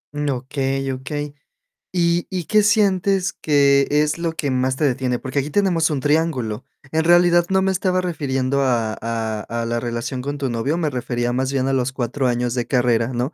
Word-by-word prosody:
Okey, 135 -1 -2
okey. 145 +3 -5 0.6
¿Y 170 -1 +1
y 185 -2 -3
qué 215 +5 +4
sientes, 195 -3 +2
que 140 -2 +3
es 150 +2 +1
lo 165 -1 -1
que 145 -4 -2
más 130 0 0
te 145 - -3
detiene? 125 -2 0
Porque 130 +3 -3
aquí, 140 - -3
tenemos 170 -2 +2
un 145 -3 -2
triángulo. 135 -7 0 0.3
En 160 0 +1
realidad, 175 0 +4
no 190 0 +2
me 190 - +2
estaba 185 0 0
refiriendo, 140 -6 -1
a 120 -5 +1
a 110 -2 -3 0.2
a - - -3
la 120 0 -1
relación 120 +2 -4
con 145 +2 -4
tu 135 -3 -2
novio, 120 +8 -1
me 160 -4 -1
refería, 120 -1 -2
más 130 +1 -1
bien, 135 -1 0
a 135 - 0
los 130 0 0
4 130 +1 -1
años 120 0 0
de 120 -1 -2
carrera, 120 -3 +2
¿no? 125 +3 -3
140 Hz, 195 wpm, -21 LUFS, 125-165 Hz, 0.6 s, qué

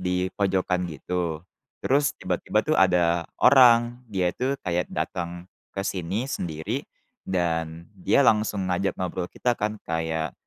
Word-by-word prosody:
dipojokan 90 0 0
gitu, 85 +1 -3 0.4
terus 140 +2 +3
tiba-tiba - - 0
tuh - - 0
ada 85 -2 +3
orang, 120 -2 +6
dia 90 -2 +1
itu 135 +2 -1
kayak 90 -1 -1
datang 85 0 -4 0.3
ke - - 0
sini 95 +5 -2
sendiri, 80 - -4 0.4
dan 85 -2 -2
dia 95 +8 +2
langsung 105 -4 +2
ngajak 95 +2 -1
ngobrol 90 -1 -3
kita 120 +5 0
kan 105 +1 -2
kayak, 80 -1 -2
90 Hz, 125 wpm, -25 LUFS, 85-105 Hz, 0.4 s, orang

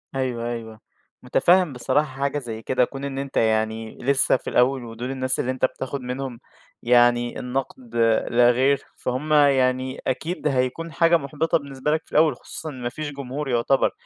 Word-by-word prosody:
أيوَه، 120 -3 -2
أيوَه، 110 -2 -7 0.4
متفهم 180 -4 +3
بصراحة 145 +4 +1
حاجة 140 +1 0
زي 115 -4 -7
كده 125 +2 +2
كون 135 +2 -9
إن 135 -1 -5
أنت 140 -1 -5
يعني 110 0 0
لسّه 135 0 +2
في - - -7
الأوّل 125 +1 +2
ودول 120 +3 -6
الناس 130 -1 -1
اللي 130 - 0
أنت 130 0 +1
بتاخد 135 +1 -4
منهم 125 -1 -5 0.4
يعني 120 0 +3
النقد 125 -2 -5 0.4
لا 120 0 +5
غير، 135 +3 +2
فهمَّ 140 +5 -2
يعني 130 -2 +3
أكيد 155 +5 -2
هيكون 135 +4 -1
حاجة 170 +1 +4
محبطة 150 +2 0
بالنسبة 140 -1 -3
لك 155 +1 +1
في - - -25
الأوّل 155 0 +4
خصوصًا 160 - -8
إن 130 -4 -9
ما 120 - -2
فيش 150 +3 -5
جمهور 140 +1 -5
يعتبر. 120 +3 +2
130 Hz, 170 wpm, -23 LUFS, 120-140 Hz, 0.4 s, لا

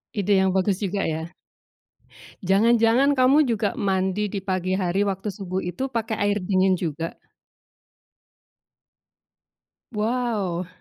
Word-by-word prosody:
Ide 200 -1 +2
yang 190 - +2
bagus 190 +1 0
juga 200 0 -1
ya. 160 +1 -3 1.1
Jangan-jangan 230 +7 +4
kamu 275 +4 +5
juga 210 -2 -1
mandi 190 +1 -1
di 200 - -2
pagi 185 -1 -2
hari 190 +1 +1
waktu 195 +1 -3
subuh 190 -2 -4
itu 225 +11 -4
pakai 225 -2 -2
air 205 0 +1
dingin 190 0 +2
juga? 165 -1 -4 2.7
Wow. 210 -6 -1
195 Hz, 110 wpm, -24 LUFS, 185-220 Hz, 2.7 s, kamu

